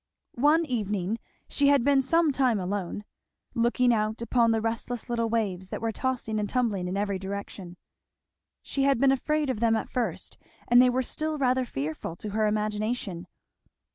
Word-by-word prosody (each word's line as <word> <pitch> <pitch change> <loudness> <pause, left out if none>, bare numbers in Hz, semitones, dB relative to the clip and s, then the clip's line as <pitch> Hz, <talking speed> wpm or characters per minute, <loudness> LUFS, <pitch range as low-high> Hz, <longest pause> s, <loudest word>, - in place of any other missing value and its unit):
One 315 +4 +4
evening 210 - -2 0.3
she 285 - +2
had 280 -3 +4
been 280 0 +4
some 325 +3 +2
time 255 -6 +2
alone, 190 +1 -3 0.5
looking 240 +1 +2
out 215 0 -1
upon 235 0 +2
the 225 -1 +2
restless 230 +2 -3
little 230 -1 0
waves 195 -5 -1
that - - -4
were 225 -1 -1
tossing 235 -3 -2
and 205 -1 -2
tumbling 215 -8 0
in 185 +2 -2
every 200 -1 -1
direction. 190 -2 -7 0.9
She 275 - -2
had 275 -1 +3
been 270 +2 +4
afraid 295 +1 0
of 215 - -4
them 230 -1 +3
at 220 - -3
first 245 -2 -3 0.3
and 245 +1 +7
they 250 - +5
were 255 +1 0
still 310 +4 -3
rather 260 -2 +2
fearful 155 - -4
to 210 - -6
her 215 +1 +1
imagination. 210 -3 -2
230 Hz, 170 wpm, -27 LUFS, 205-260 Hz, 0.9 s, and